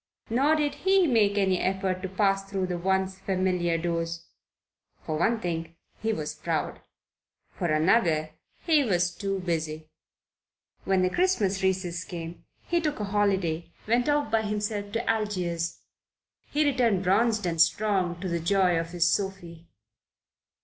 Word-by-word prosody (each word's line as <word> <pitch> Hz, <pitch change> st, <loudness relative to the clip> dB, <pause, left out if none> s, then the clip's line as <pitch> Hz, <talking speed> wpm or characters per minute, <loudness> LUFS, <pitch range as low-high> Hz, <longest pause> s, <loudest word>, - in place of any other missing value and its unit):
Nor 275 Hz, +6 st, +3 dB
did 295 Hz, -2 st, 0 dB
he 385 Hz, -1 st, +4 dB
make 215 Hz, -7 st, +3 dB
any 190 Hz, -2 st, +2 dB
attempt 190 Hz, -1 st, -1 dB
to 190 Hz, -, -4 dB
pass 195 Hz, 0 st, +1 dB
through 195 Hz, -1 st, -1 dB
the 180 Hz, -1 st, -3 dB
once 190 Hz, +1 st, 0 dB
familiar 180 Hz, -3 st, 0 dB
doors. 165 Hz, 0 st, -3 dB, 0.8 s
For 155 Hz, -, -3 dB
one 220 Hz, +9 st, +1 dB
thing, 165 Hz, -3 st, -4 dB, 0.3 s
he 220 Hz, +1 st, 0 dB
was 150 Hz, -7 st, -3 dB
proud: 155 Hz, 0 st, -3 dB, 0.7 s
for 175 Hz, -, -3 dB
another 155 Hz, -1 st, +2 dB, 0.3 s
he 315 Hz, -4 st, +4 dB
was 180 Hz, -6 st, +1 dB
too 195 Hz, +1 st, -3 dB
busy. 155 Hz, -3 st, -3 dB, 0.9 s
When 190 Hz, -1 st, +2 dB
the 185 Hz, -, +1 dB
Christmas 205 Hz, -, +1 dB
recess 185 Hz, -2 st, -1 dB
came 170 Hz, -2 st, -8 dB, 0.2 s
he 345 Hz, -1 st, 0 dB
took 300 Hz, -5 st, -2 dB
a -, -, -2 dB
holiday, 190 Hz, -5 st, 0 dB
went 240 Hz, +5 st, +2 dB
off 290 Hz, -6 st, +1 dB
by 225 Hz, 0 st, +3 dB
himself 210 Hz, -1 st, -3 dB
to 230 Hz, -, -2 dB
Algiers. 180 Hz, -6 st, -1 dB, 0.7 s
He 300 Hz, +1 st, +1 dB
returned 240 Hz, -9 st, +2 dB
bronzed 210 Hz, +2 st, +2 dB
and 165 Hz, -2 st, +1 dB
strong, 180 Hz, -1 st, +2 dB
to 190 Hz, -, -3 dB
the 170 Hz, -1 st, -1 dB
joy 180 Hz, 0 st, +2 dB
of 165 Hz, 0 st, -4 dB
his 175 Hz, -1 st, +2 dB
Sophie. 175 Hz, -4 st, -2 dB
190 Hz, 150 wpm, -27 LUFS, 170-215 Hz, 0.9 s, he